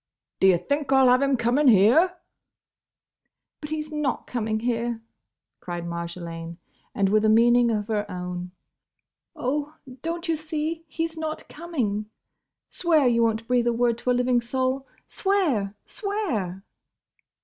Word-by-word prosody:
"D' - - +3
ye 185 -2 +6
think 285 - -2
I 270 - +6
'll 255 - +6
have 250 +1 +5
him 275 -1 +2
coming 245 +5 +2
here—?" 250 - +5 1.5
"But 300 - -6
he's 310 0 -4
not 300 -3 -2
coming 220 -3 -2
here!" 235 -1 -1 0.6
cried 175 -1 -5
Marjolaine; 170 -1 -6 0.4
and 195 -1 +2
with 215 +1 +3
a 215 - +4
meaning 240 +2 +5
of 210 -2 -1
her 210 -2 -1
own: 180 -1 -5 0.9
"Oh, 290 +4 -2 0.3
don't 335 +2 -4
you 330 - +2
see 315 +1 -4
he's 325 +1 -3
not 315 0 -4
coming?—Swear 295 - -2
you 235 -1 +3
won't 225 0 0
breathe 245 -1 +2
a 240 - +3
word 235 0 +1
to 250 - -3
a - - +5
living 245 0 +2
soul! 260 +2 -1 0.2
Swear! 300 - 0
Swear!" 260 - -3
245 Hz, 140 wpm, -25 LUFS, 210-300 Hz, 1.5 s, ye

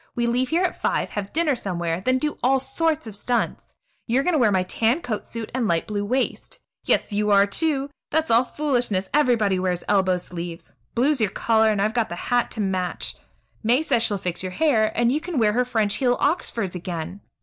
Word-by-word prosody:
We 240 - 0
leave 245 +2 +1
here 340 +3 +2
at 365 - -2
five, - - 0
have 205 -1 -4
dinner 320 -2 +2
somewhere, 175 -5 -2
then 255 +6 +2
do 300 +3 -2
all 265 +2 +3
sorts 325 -1 -1
of 220 -3 -6
stunts. 235 +3 -2 0.3
You 245 +3 +2
are - - +1
going 360 - +1
to 310 - +3
wear 225 -4 +4
my 185 -2 +2
tan 225 - +1
coat 225 -7 -4
suit 230 -2 -5
and 250 -3 0
light 170 -3 +1
blue 205 -1 -2
waist. 255 +6 -1 0.3
Yes, - - +1
you 210 +1 +1
are, 200 -1 +6
too! 280 +5 0 0.2
That's 320 -1 0
all 230 +2 +5
foolishness; 245 -9 -1
everybody 230 -10 +3
wears 180 -1 -1
elbow 190 -3 +3
sleeves. 175 -1 -7 0.2
Blue's 265 +2 +2
your 215 - +2
color, 220 +2 +2
and 210 - -1
I've 210 +2 +1
got 235 -5 0
the 175 - -4
hat 245 +7 0
to - - -6
match. 185 -2 -2 0.5
May 240 +7 +2
says 245 -7 +1
she'll 210 -3 +2
fix 180 -2 -3
your 185 -1 -4
hair, 225 -8 +2
and 235 0 +3
you 300 +4 0
can 345 -2 -4
wear 215 -3 +3
her 250 +2 +2
French 220 -5 0
heel 245 0 +2
Oxfords 230 - -1
again. 180 +1 -5
225 Hz, 215 wpm, -23 LUFS, 195-260 Hz, 0.5 s, are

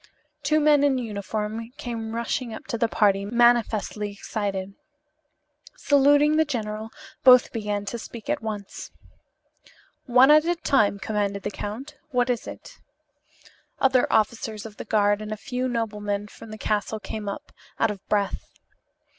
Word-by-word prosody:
Two 305 +2 +2
men 295 -1 +4
in 280 -2 +3
uniform 215 0 -4
came 230 -5 -5
rushing 235 0 -2
up - - -10
to - - -3
the 230 - +3
party, 200 -3 +2
manifestly 220 -2 +2
excited. 200 -1 -4 1.0
Saluting 290 +2 +4
the 315 - +5
general, 220 -6 -4 0.3
both 250 -1 +7
began 210 -3 -2
to 235 +4 -4
speak 225 0 -10
at 295 -3 -1
once. 210 -3 -6 1.2
"One 255 +3 +6
at 305 0 +7
a 345 +1 +1
time," 240 -11 +2
commanded 200 -1 -2
the 205 - -3
count. 260 +10 -7
"What 250 -2 +1
is 240 - -3
it?" - - -10 1.0
Other 260 -2 +3
officers 220 0 0
of 215 -2 -10
the - - -7
guard 205 -1 +2
and 215 0 -6
a 215 - -3
few 250 +3 -3
noblemen 210 -3 -2
from 225 - -13
the 215 - -8
castle 215 +1 -1
came 210 -1 -5
up, 200 - -7 0.3
out - - +3
of 200 -2 -9
breath. 205 -2 0
220 Hz, 150 wpm, -25 LUFS, 210-250 Hz, 1.2 s, both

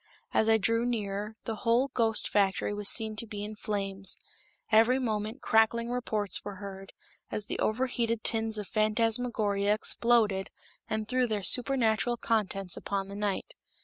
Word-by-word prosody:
As 220 - +3
I 220 - +6
drew 230 +3 +1
nearer, 210 -3 -3
the 225 -2 -4
whole 235 +5 +2
ghost 225 -4 +2
factory 200 0 +1
was 205 -1 +1
seen 220 -2 +3
to 230 - -2
be 205 -2 -6
in 215 +1 -6
flames; 195 -2 0 0.5
every 225 +4 +5
moment 220 0 -3
crackling 230 +2 +2
reports 220 -5 -1
were 205 -1 -6
heard, 195 0 -9 0.4
as 210 - -3
the - - -4
over 230 +5 +1
heated 230 -3 -1
tins 220 -1 +1
of 210 -2 -5
phantasmagoria 215 -2 +1
exploded 215 -3 +2 0.4
and 215 0 -2
threw 255 0 +1
their 210 -3 -2
supernatural 240 +1 +1
contents 195 -6 -1
upon 195 -1 -3
the 200 - -7
night. 205 -1 -3
215 Hz, 155 wpm, -29 LUFS, 205-230 Hz, 0.5 s, I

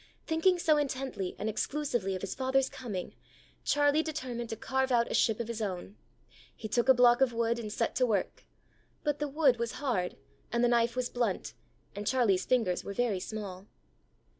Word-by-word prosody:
Thinking 335 +3 +3
so 315 -3 +3
intently 265 -9 -2
and 210 - -3
exclusively 240 -4 -1
of 185 - -5
his 195 - -3
father's 265 0 +1
coming, 205 -8 -5 0.5
Charlie 290 +1 +3
determined 255 -7 -4
to - - -3
carve 265 +3 -1
out 235 -1 +2
a - - -1
ship 225 -1 +2
of 235 - -3
his 230 -1 -4
own. 195 -1 -4 0.6
He 220 - -6
took 240 +4 +1
a - - +10
block 245 0 +5
of 260 -3 +3
wood, 230 0 0
and 215 -3 -5
set 230 +2 -1
to 255 - +4
work. 205 -5 -1 0.6
But 295 -1 0
the 295 - -1
wood 280 -3 +3
was 235 -1 -2
hard, 235 -11 -2 0.3
and 235 0 +1
the - - +5
knife 235 0 +2
was 255 -1 0
blunt, 235 -6 -1 0.4
and 205 0 -5
Charlie's 220 -8 +2
fingers 225 -8 +1
were 200 - -5
very 230 -5 +1
small. 200 -2 -6
240 Hz, 190 wpm, -30 LUFS, 210-265 Hz, 0.6 s, a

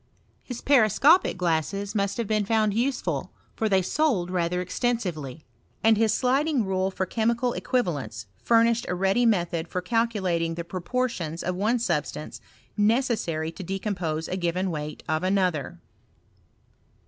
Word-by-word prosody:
His 250 -2 -7
periscopic 280 - +4
glasses 180 +4 -1
must 200 -2 -1
have 235 - -1
been 215 0 +1
found 215 0 +1
useful^ 210 - -1 0.3
for 220 - 0
they 190 -2 +3
sold 210 - 0
rather 180 -1 0
extensively: 180 - -2 0.4
and 225 0 +6
his 220 0 +2
sliding* 265 +2 +1
rule 190 0 0
for 190 0 -2
chemical 235 +4 0
equivalents 140 - -2 0.2
furnished 230 0 +3
a 180 - 0
ready 195 +6 +2
method 175 -5 0
for 180 - -3
calculating 185 -6 0
the 170 - -4
proportions 180 -3 -3
of 180 - -1
one 215 +6 +1
suIh 235 - 0
stance - - -8 0.3
necessary 210 -8 +1
to 180 - -9
decompose 180 -4 -3
a 185 - -3
given 180 +1 -1
weight 150 -1 -5
of 155 0 0
another. 185 -5 0
195 Hz, 140 wpm, -26 LUFS, 170-230 Hz, 0.4 s, and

